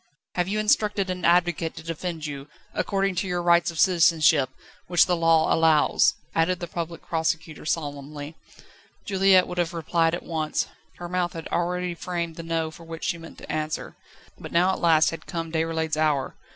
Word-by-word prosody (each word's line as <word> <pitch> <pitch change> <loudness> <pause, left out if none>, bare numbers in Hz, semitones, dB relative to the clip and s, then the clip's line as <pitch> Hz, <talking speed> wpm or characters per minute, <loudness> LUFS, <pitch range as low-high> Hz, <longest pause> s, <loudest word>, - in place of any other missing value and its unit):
"Have 180 0 0
you 205 +2 -1
instructed 210 -3 +1
an 180 -1 -5
advocate 175 -1 +2
to - - -9
defend 165 0 -4
you, 140 -1 -6 0.3
according 195 -1 0
to 190 - 0
your 180 -1 -1
rights 170 +1 +4
of 165 -2 -6
citizenship, 160 -6 +4 0.4
which 175 -1 +5
the 180 - +1
Law 165 -1 +3
allows?" 160 -2 +4 0.2
added 170 +2 +1
the 175 - -4
Public 170 0 -6
Prosecutor 160 -1 -2
solemnly. 145 -1 -4 0.7
Juliette 190 -2 +4
would 180 0 -4
have 175 0 -1
replied 165 0 +1
at - - -8
once; 155 -2 -1 0.3
her 175 - -6
mouth 180 0 -1
had 165 -1 -6
already 180 +1 -1
framed 170 -1 -4
the 165 - -6
No 165 -1 -2
with 160 - -14
which 165 -1 -9
she 170 - -1
meant 165 0 -12
to - - -8
answer. 155 0 -3 0.4
But - - -9
now 180 +3 +3
at - - -3
last 160 -3 +4
had 165 0 -8
come 165 -2 -4
Déroulède's 160 -1 -1
hour. 150 -3 +1
165 Hz, 180 wpm, -25 LUFS, 160-180 Hz, 0.7 s, which